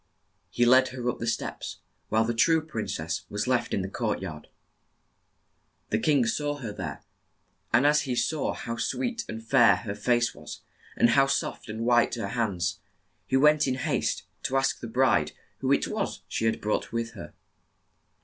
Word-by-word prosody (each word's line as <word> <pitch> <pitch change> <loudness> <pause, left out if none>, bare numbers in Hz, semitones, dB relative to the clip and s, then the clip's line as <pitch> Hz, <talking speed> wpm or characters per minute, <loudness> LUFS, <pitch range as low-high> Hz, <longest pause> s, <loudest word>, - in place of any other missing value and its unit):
He 120 +6 +2
led 130 +2 +6
her 125 -1 -5
up - - -11
the 115 - -3
steps, 115 - -3 0.3
while 110 +1 +3
the 120 - 0
true 160 +8 +4
prin 115 -9 -4
cess - - -3
was 105 0 -2
left 125 -1 0
in 100 - 0
the - - -3
court 105 +2 -2
yard. 80 -5 -7 1.4
The 110 - +2
king 140 -1 +3
saw 145 +5 -1
her 120 -7 -6
there, - - -6 0.7
and 120 +5 +4
as 150 0 +5
he 130 -3 -2
saw 140 +5 0
how 115 0 -5
sweet 245 - -2
and 110 0 -6
fair 120 -5 +6
her 100 +2 -5
face 120 +3 +1
was, - - -10 0.4
and 120 - +5
how 135 +2 +5
soft 135 - -2
and 110 +1 -5
white 120 0 +3
her 115 - -4
hands, 100 -7 -1 0.5
he 130 - +2
went 150 +1 +5
in 130 - +1
haste 130 - -1 0.2
to 135 - 0
ask 135 - +1
the 115 - -6
bride 110 -11 +2 0.3
who - - 0
it - - +3
was - - -3
she - - -2
had 110 - 0
brought 105 - -1
with 115 0 -2
her. - - -10
120 Hz, 185 wpm, -27 LUFS, 110-135 Hz, 1.4 s, led